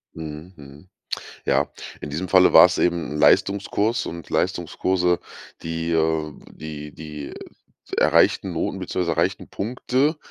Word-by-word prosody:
Mhm, 80 +3 -8
mhm. 70 +3 -14 0.6
Ja. - - +2 0.3
In 75 - -6
diesem 85 +6 -3
Falle 90 +1 +5
war - - +10
es 90 - -2
eben 85 -3 0
'n - - -4
Leistungskurs 100 +6 +2
und 85 -1 -7
Leistungskurse, 90 -1 0 0.4
die, 80 0 -3
äh 80 -1 +1 0.2
die 75 -1 -8
die 75 -2 -8 0.6
erreichten - - +3
Noten - - -2
beziehungsweise 85 -2 -2
erreichten 90 +4 -1
Punkte, 125 +7 -1
85 Hz, 130 wpm, -23 LUFS, 75-95 Hz, 0.6 s, war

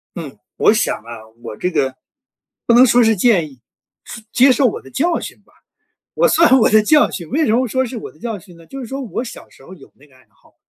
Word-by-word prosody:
嗯， 145 - -8 0.2
我 - - +4
想 215 - 0
啊， 115 -1 -12
我 115 -3 -9
这 180 - -2
个 130 -4 -1 0.7
不 235 - +4
能 250 +2 +7
说 245 0 +4
是 225 -1 +3
建 185 -7 +2
议， 130 -3 -19 0.4
是 225 - -11
接 260 +3 +5
受 260 +1 +3
我 220 - -3
的 135 - -16
教 335 +4 0
训 - - -10
吧。 - - -31 0.6
我 - - +2
算 325 - +4
我 - - +3
的 215 0 +5
教 300 +7 +3
训， 170 -5 -7
为 310 +5 0
什 215 - +1
么 250 +2 +1
说 260 +3 0
是 245 0 -7
我 - - -9
的 - - -24
教 225 -3 -5
训 180 -2 -17
呢？ 165 -1 -18
就 270 - -9
是 250 - -7
说 270 +3 -6
我 240 0 -5
小 - - -11
时 - - -20
候 185 - -12
有 150 - -18
那 145 - -21
个 135 -3 -25
爱 130 - -25
好， - - -29
220 Hz, 275 characters per minute, -17 LUFS, 160-260 Hz, 0.7 s, 能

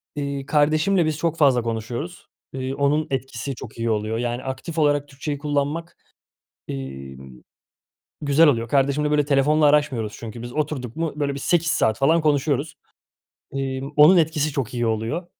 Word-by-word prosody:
iii, 140 -1 -3
kardeşimle 155 +5 +2
biz 155 -2 -1
çok 165 +1 -1
fazla 135 -5 +4
konuşuyoruz. 120 +8 -5 0.3
Iıı, 130 0 -3
onun 145 +2 +1
etkisi 130 -1 -3
çok 120 -3 -10
iyi 115 0 -1
oluyor. 110 +1 -1
Yani 120 +1 -2
aktif 135 +5 -6
olarak 145 -1 +2
Türkçeyi 145 +1 -5
kullanmak, 145 +3 -2 0.7
emm, 65 0 -7 0.9
güzel 150 +2 +4
oluyor. 115 -4 +1
Kardeşimle, 140 +3 +1
böyle, 150 -1 +3
telefonla 150 +2 +3
araşmıyoruz 145 -7 +2
çünkü 115 0 -8
biz. 120 0 -7
Oturduk 145 -5 -3
mu, 165 -1 -1
böyle, 145 -2 -1
bir - - -5
8 170 -2 +1
saat 110 -7 +1
falan 160 +5 +3
konuşuyoruz. 145 -1 0 0.8
emm, 135 0 -3
onun 150 +5 +8
etkisi 155 -2 +1
çok 130 -3 -3
iyi 120 -1 0
oluyor. 115 +11 -2
140 Hz, 155 wpm, -23 LUFS, 120-150 Hz, 0.9 s, onun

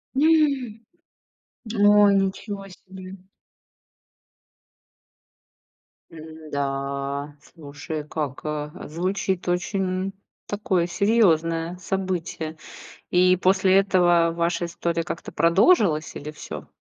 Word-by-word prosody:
М 275 -7 +2 0.9
Ой, 205 -1 +5
ничего 195 +1 -2
себе. 185 0 -11 3.0
М-да, 140 -2 -4 0.2
слушай, 150 0 -7
как, 150 -2 -4
э, 150 -1 -3 0.2
звучит 185 +3 -2
очень 185 +1 -1 0.3
такое 190 -4 0
серьёзное 175 -5 +1
событие. 180 -4 -4 0.5
И 180 +1 +4
после 190 +1 +3
этого 175 -3 +3
ваша 170 +1 -1
история 170 0 -2
как-то 165 - -6
продолжилась 170 - +3
или 150 - -7
всё? 150 - -9
175 Hz, 80 wpm, -24 LUFS, 160-195 Hz, 3.0 s, Ой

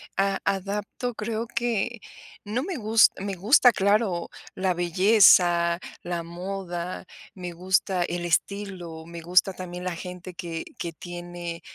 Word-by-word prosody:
a 195 0 +1
adapto, 205 +5 -2
creo 220 +2 -3
que 235 0 -1 0.5
no 235 +6 -1
me 365 -2 -4
gus 225 -1 +5
me 200 +1 -3
gusta, 235 +6 +6
claro, 200 -3 +1 0.3
la 185 -1 +1
belleza, 175 -1 +5 0.2
la 175 -1 -3
moda, 180 0 -5 0.3
me 180 -1 -6
gusta 185 +1 +1
el 175 0 -3
estilo, 175 -2 -2
me 170 0 -8
gusta 180 +3 +3
también 180 -1 -7
la 185 -1 -2
gente 180 +1 -8
que 170 -1 -5 0.2
que 170 -1 -4
tiene 175 0 -7
eh, - - -20
185 Hz, 140 wpm, -26 LUFS, 175-205 Hz, 0.5 s, gusta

